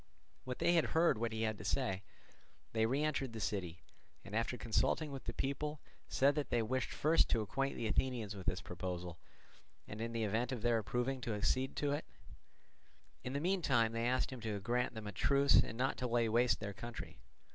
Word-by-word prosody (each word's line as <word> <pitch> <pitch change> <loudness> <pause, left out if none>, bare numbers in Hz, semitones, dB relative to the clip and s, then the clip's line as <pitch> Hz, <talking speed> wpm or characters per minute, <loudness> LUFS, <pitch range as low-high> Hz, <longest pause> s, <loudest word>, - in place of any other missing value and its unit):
When 125 -1 -3
they 175 - +3
had 165 -2 +4
heard 165 -9 +4
what 115 0 -1
he 110 0 -2
had 110 -2 -1
to - - -7
say, 95 -9 0 0.7
they 110 0 +3
re 135 +5 +1
entered 135 -5 -1
the 110 - -5
city, 90 -5 -3 0.4
and 100 - -6
after 115 +2 0
consulting 120 +7 +1
with 135 -1 -7
the - - -2
people 150 +2 -2 0.3
said 140 +2 +3
that 145 -1 -2
they 120 -2 +2
wished 130 +2 -1
first 160 +3 +3
to 115 - +2
acquaint 135 +6 -1
the 115 - -3
Athenians 110 -2 0
with 95 -2 -9
this 90 - 0
proposal, 90 -1 -5 0.7
and 105 +2 -6
in 115 0 -2
the 115 -1 -1
event 115 +4 0
of 120 -4 -4
their 120 -1 +3
approving 125 +5 -1
to 115 -3 -2
accede 130 +5 0
to 145 -1 0
it; 145 +2 -2 1.2
in 125 - -4
the 140 - 0
meantime 145 -10 +2
they 115 +1 -1
asked 130 +2 +1
him 125 - -8
to 110 -2 -2
grant 120 +4 0
them 110 -1 -6
a 105 - -4
truce 140 +8 +4
and 115 - +2
not 130 +2 0
to 125 - -1
lay 120 -1 +2
waste 120 +1 +3
their 100 -2 -4
territory. 120 +4 -7
120 Hz, 210 wpm, -36 LUFS, 110-135 Hz, 1.2 s, had